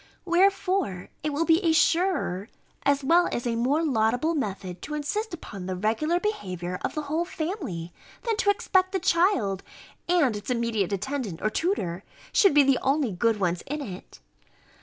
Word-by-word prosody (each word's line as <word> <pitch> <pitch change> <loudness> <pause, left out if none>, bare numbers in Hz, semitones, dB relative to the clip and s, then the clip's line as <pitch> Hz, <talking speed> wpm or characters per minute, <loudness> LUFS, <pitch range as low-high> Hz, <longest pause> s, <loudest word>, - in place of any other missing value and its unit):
Wherefore 365 - +1
it 305 - -1
will 300 +3 0
be 325 0 +5
a 330 -2 +3
surer, 325 - +1 0.3
as 280 0 +2
well 340 +5 +4
as 240 - -3
a 235 -1 0
more 270 +7 +1
laudable 245 +3 +1
method, 195 - -4
to 300 - -5
insist 400 +10 -2
upon 200 - -7
the 185 - -2
regular 225 - 0
behaviour 180 - -3
of - - -2
the 305 - -2
whole 310 +4 -1
family, 315 - -4 0.3
than 460 -2 0
to 405 - +2
expect 375 -1 +2
the 380 - +1
child, 335 - +2 0.5
and 310 -10 +3
its 205 +2 -7
immediate 230 -6 0
attendant 210 -3 -3
or 215 - +1
tutor, 195 - -1 0.3
should 390 -7 +5
be 290 - +8
the 270 -2 +3
only 270 -3 +1
good 220 +4 +1
ones 175 -2 0
in 295 +2 -3
it. 195 -10 -8
280 Hz, 170 wpm, -26 LUFS, 205-340 Hz, 0.5 s, be